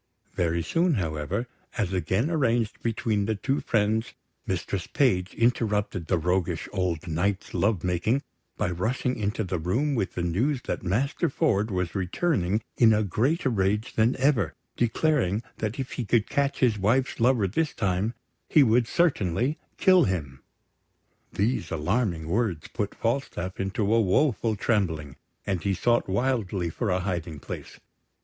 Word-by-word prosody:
Very 85 -1 0
soon, 170 - +2
however, 80 +4 -2 0.3
as 100 -5 0
again 95 - 0
arranged 120 -8 +1
between 110 -3 0
the 110 - 0
two 135 +7 -1
friends, 110 +1 0 0.3
Mistress 95 -4 -2
Page 95 -9 +1
interrupted 105 -7 0
the 90 - +2
roguish 90 0 0
old 90 -4 -1
Knight's 90 +5 -1
love 100 -4 +1
making 90 - +1 0.3
by 105 -4 0
rushing 120 +8 -1
into 105 +1 -1
the 90 -2 -2
room 120 - 0
with 110 -7 -1
the 90 - -2
news 120 - 0
that - - -3
Master 115 +10 0
Ford 105 -5 +1
was 90 -4 -2
returning 100 - 0
in 115 -2 +6
a 110 - +2
greater 130 - +1
rage 105 +2 0
than 115 +2 +3
ever, 135 -1 +1 0.2
declaring 120 - +1
that 110 +1 -3
if 130 -2 -4
he 125 - -3
could 115 0 +2
catch 140 0 0
his 115 -5 +3
wife's 125 +8 +1
lover 120 -4 +3
this 155 - 0
time 100 +3 -1 0.3
he 150 - +6
would 115 -1 +3
certainly 130 - +1 0.2
kill 185 -4 +5
him. 75 -9 -3 0.9
These 115 +6 0
alarming 85 0 -1
words 95 -4 -1
put 105 -3 -3
Falstaff 115 -6 -2
into 100 +2 0
a 115 - +5
woeful 115 +2 +2
trembling, 85 - -1 0.3
and 95 -4 -1
he 100 -1 0
sought 120 +3 +1
wildly 100 -5 0
for 110 +5 -2
a 90 0 +1
hiding 85 -4 -3
place. - - -8
105 Hz, 150 wpm, -26 LUFS, 90-120 Hz, 0.9 s, in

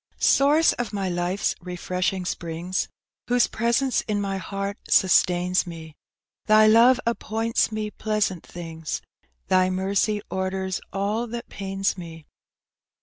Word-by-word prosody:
Source 295 +4 +4
of 240 -3 -4
my 195 -2 -1
life's 175 +2 -1
refreshing 180 +1 -2
springs, 175 +2 -3 0.4
Whose 245 -1 +4
presence 235 +3 +1
in 210 -2 0
mj 195 -1 -2
heart 195 +2 -4
sustains 180 -1 +3
me, 160 -2 -9 0.5
Thy 215 0 +6
love 235 +4 +6
appoints 230 -1 0
me 215 -1 -3
pleasant 210 -6 -1
things, 165 -2 -6 0.4
Thy 185 0 +3
mercy 200 +3 0
orders 190 0 -2
all 205 +5 -1
that 235 +1 -7
pains 195 0 -2
me. 165 -2 -9
195 Hz, 120 wpm, -24 LUFS, 180-215 Hz, 0.5 s, Thy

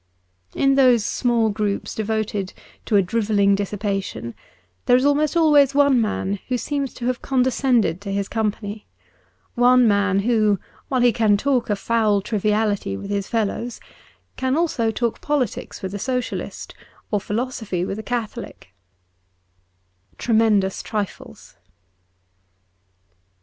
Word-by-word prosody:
In 275 0 +3
those 250 -5 +4
small 235 -3 +1
groups 205 -1 -2
devoted 215 -3 -2 0.3
to 220 - +1
a 200 - +5
drivelling 205 0 +2
dis 200 0 -1
sipation 195 - -3 0.5
there 245 - +6
is 255 - +1
almost 295 +3 +2
always 290 -4 +5
one 280 -4 +4
man 200 -2 -2
who 255 - 0
seems 280 +1 -3
to 240 - -6
have 250 0 -1
condescended 250 - +1
to 200 -1 -5
his 200 0 -1
company: 210 -1 -3 0.7
one 245 0 +5
man 200 -2 +2
who, 215 -3 +2 0.3
while 260 -2 0
he 240 -1 +4
can 215 -3 +3
talk 260 +1 0
a 205 - +2
foul 215 -1 +1
triviality 210 - -1
with 200 - -7
his 200 -1 -2
fellows, 230 +1 -2 0.6
can 260 +2 0
also 300 -9 +1
talk 230 +1 -2
politics 280 -11 -2
with 190 0 -4
a 205 - -4
Socialist, 250 +1 -4 0.4
or 205 -2 +1
philosophy 215 -5 -3
with 195 +2 -4
a - - -3
Catholic, 230 - -5 0.8
' 90 +1 -41
Tremendous 220 -4 +2
Trifles.'' 210 -3 -6
220 Hz, 135 wpm, -22 LUFS, 200-250 Hz, 0.8 s, there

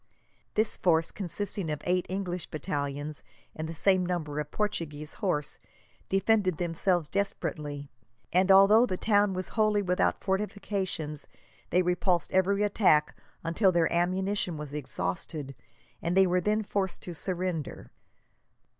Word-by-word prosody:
This 215 +1 +2
force, 165 -2 +2
consisting 195 -1 -3
of 150 -1 -4
eight 180 0 +1
English 180 -2 -3
battalions 145 0 -3 0.3
and 160 0 -4
the - - -4
same 185 +2 +3
number 160 -5 -2
of 150 -1 -4
Portuguese 155 -8 -3
horse, 160 -7 -2 0.5
defended 195 -3 +2
themselves 175 -1 +1
desperately, 150 -7 -3 0.5
and 185 +2 +4
although 205 +5 +7
the 185 - -2
town 205 -1 +3
was 185 0 -4
wholly 215 -2 +2
without 180 -1 +1
fortifications, 190 -6 -2 0.4
they 180 +1 +3
repulsed 180 0 +1
every 200 +2 +2
attack 185 -7 +3 0.3
until 185 +4 +3
their 170 -2 +2
ammunition 185 0 0
was 150 -1 -7
exhausted, 135 - -3 0.5
and 175 +3 0
they 190 - +7
were 180 0 +2
then 210 +3 +1
forced 195 -2 -2
to 175 - -6
surrender. 175 - -3
180 Hz, 130 wpm, -29 LUFS, 155-195 Hz, 0.5 s, although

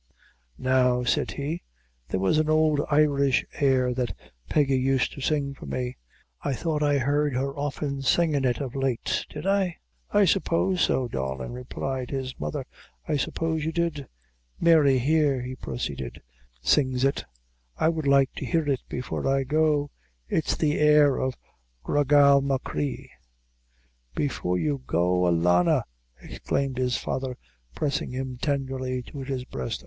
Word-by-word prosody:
"Now," 125 -1 +2
said 120 - +1
he, 150 +4 -3 0.5
"there 95 - -1
was 95 +11 +2
an 155 0 +1
ould 155 -1 +3
Irish 140 -3 +3
air 130 -3 +3
that 120 -7 -3 0.3
Peggy 140 -3 +2
used 130 0 +1
to 140 - -9
sing 140 -1 0
for - - -11
me 125 -1 -3 0.5
I 140 - -1
thought 155 +3 -2
I 145 -1 +3
heard 145 +1 +1
her 135 +2 -1
often 145 -1 -3
singin' 145 +1 +2
it 125 -3 +1
of 130 -4 -4
late 135 -3 -1
did - - -7
I?" 195 -3 +1 0.3
"I 205 -1 +4
suppose 185 0 +1
so, 130 -2 +2
darlin'," 65 - -4
replied 125 +1 -4
his 130 -2 -3
mother; 75 0 -3 0.4
"I - - +1
suppose 160 +2 -1
you 160 - -1
did." 165 -4 -2 0.5
"Mary, 155 -5 +5
here," 140 -1 +2
he 130 +1 -5
proceeded, 70 - -5 0.4
"sings 130 - +2
it; 135 - 0 0.5
I - - +2
would 160 -3 0
like 140 -1 +4
to - - -4
hear 160 +4 0
it 135 -3 0
before 125 +1 -3
I 135 0 +2
go; 150 0 +1 0.4
it's 160 - 0
the 150 -1 +1
air 150 -2 +5
of 130 -1 -1 0.5
Gra 145 0 +1
Gal 140 0 +6
Machree." 135 - -3 1.0
"Before 90 -10 -1
you 145 +4 -1
go, 90 +1 +2
alanna!" 90 +1 +3 0.4
exclaimed 135 - -3
his 125 -1 +1
father, 130 -1 -3 0.4
pressing 145 -2 -1
him 130 -1 -5
tenderly 130 -3 -2
to 140 - -9
his 135 -2 -4
breast. 65 - -4
135 Hz, 150 wpm, -26 LUFS, 125-150 Hz, 1.0 s, Gal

